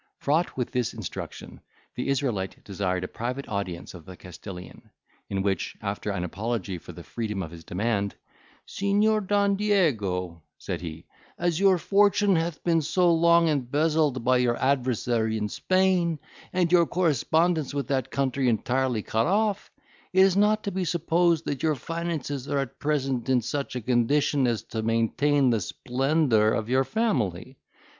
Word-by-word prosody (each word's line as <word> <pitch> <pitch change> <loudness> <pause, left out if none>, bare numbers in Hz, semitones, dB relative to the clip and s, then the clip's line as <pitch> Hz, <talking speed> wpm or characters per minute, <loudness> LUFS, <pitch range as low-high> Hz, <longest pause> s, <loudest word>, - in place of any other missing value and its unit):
Fraught 155 +3 0
with 125 - -2
this 125 -2 -1
instruction, 110 -6 -7 0.3
the 125 - -4
Israelite 125 -9 -2
desired 95 -2 -2
a - - -3
private 125 +7 -5
audience 100 -5 -4
of 90 -3 -11
the 90 +2 -11
Castilian, 90 0 -10 0.4
in 95 -1 -1
which, 95 -3 -2
after 100 0 -4
an 100 -3 -2
apology 95 0 -3
for - - -11
the - - -11
freedom 105 -4 -4
of 80 - -8
his 85 -1 -11
demand, 100 +2 -1 0.5
"Signior 205 +2 +1
Don 200 0 +2
Diego," 105 - 0 0.2
said - - -5
he, 80 -1 -7 0.3
"as 175 -1 0
your 195 -2 +5
fortune 200 +1 +3
hath 165 -1 -2
been 165 -2 +2
so 175 +3 +2
long 170 0 +4
embezzled 150 -1 +1
by 125 +1 +4
your 120 -1 +1
adversary 120 -4 0
in 105 -1 -1
Spain, 185 - +1 0.3
and 180 -2 +1
your 170 -2 +5
correspondence 165 -1 +1
with 140 -2 -2
that 135 -3 0
country 135 -1 0
entirely 120 0 0
cut 110 +1 0
off, 205 +1 0 0.4
it 190 - +5
is 190 -1 +5
not 210 +1 +3
to 200 - -2
be 190 0 -2
supposed 170 -1 +1
that 140 - -3
your 155 -1 +2
finances 150 -2 -4
are 145 - 0
at 135 -4 -3
present 135 -4 -1
in 130 -1 +4
such 140 +3 -3
a 125 - -2
condition 130 +3 +2
as 115 -2 -1
to 110 - -4
maintain 125 +5 +2
the 115 -3 +1
splendour 125 - +1
of 110 0 -2
your 130 +1 +3
family. 130 - -1
135 Hz, 160 wpm, -26 LUFS, 110-170 Hz, 0.5 s, your